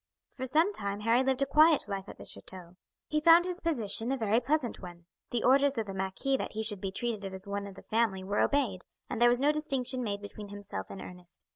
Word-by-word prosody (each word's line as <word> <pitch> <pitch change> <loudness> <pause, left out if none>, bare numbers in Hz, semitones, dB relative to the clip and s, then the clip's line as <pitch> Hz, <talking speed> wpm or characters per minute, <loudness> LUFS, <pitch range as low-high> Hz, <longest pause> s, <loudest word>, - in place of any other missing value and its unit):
For 260 -1 -5
some 320 +9 +3
time 200 - -4
Harry 230 +3 +3
lived 265 +1 +1
a - - +1
quiet 305 +1 +5
life 195 -1 -5
at - - -10
the - - -10
chateau. 180 -2 -7 0.3
He 305 0 -1
found 335 +2 +7
his 365 0 -1
position 235 - 0
a 270 - 0
very 220 -1 +2
pleasant 260 0 -1
one. 175 -2 -11 0.2
The 240 - -1
orders 275 +1 +4
of 225 - -1
the 195 - -6
marquis 190 +8 -1
that - - -5
he 220 0 -2
should 205 -3 +2
be 195 - -3
treated 210 -2 -2
as 190 +1 -9
one 200 0 -4
of 195 - -11
the - - -13
family 215 -4 0
were 200 +2 -1
obeyed, 245 -11 +1 0.3
and 240 - -3
there 240 - +7
was 245 0 +3
no 285 +3 +3
distinction 270 -4 -1
made 205 -2 -3
between 205 0 -9
himself 200 - -6
and 195 - -8
Ernest. 180 -1 -13
225 Hz, 240 wpm, -30 LUFS, 200-275 Hz, 0.3 s, found